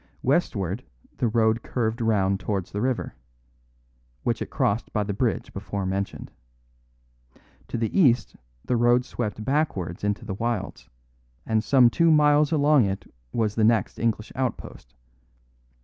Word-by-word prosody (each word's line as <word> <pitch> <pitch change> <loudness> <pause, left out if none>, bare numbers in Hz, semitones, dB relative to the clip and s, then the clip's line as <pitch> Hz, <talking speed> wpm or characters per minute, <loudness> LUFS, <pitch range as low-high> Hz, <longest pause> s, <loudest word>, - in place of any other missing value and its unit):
Westward 115 - 0 0.3
the 120 - +1
road 110 0 +2
curved 115 -1 -2
round 100 -4 +1
towards 100 -4 -3
the 105 - -3
river, 130 0 -1 1.1
which - - -1
it - - -4
crossed 105 +3 -1
by 105 - 0
the 100 0 -3
bridge 115 +1 -1
before 100 0 -4
mentioned. 95 +1 -3 1.4
To - - -4
the 115 -1 -2
east 125 -9 +3 0.3
the 125 - +1
road 120 +1 +3
swept 110 -4 -4
backwards 105 - -1
into 105 0 -1
the - - -4
wilds, 115 -1 -3 0.6
and 110 -1 +1
some 130 0 +5
two 170 +4 +3
miles 150 -1 +4
along 145 -5 +4
it 95 -1 -5 0.2
was 110 -3 0
the 110 - 0
next 110 -2 +2
English 110 -2 -1
outpost. 115 - -5
110 Hz, 140 wpm, -25 LUFS, 100-125 Hz, 1.4 s, some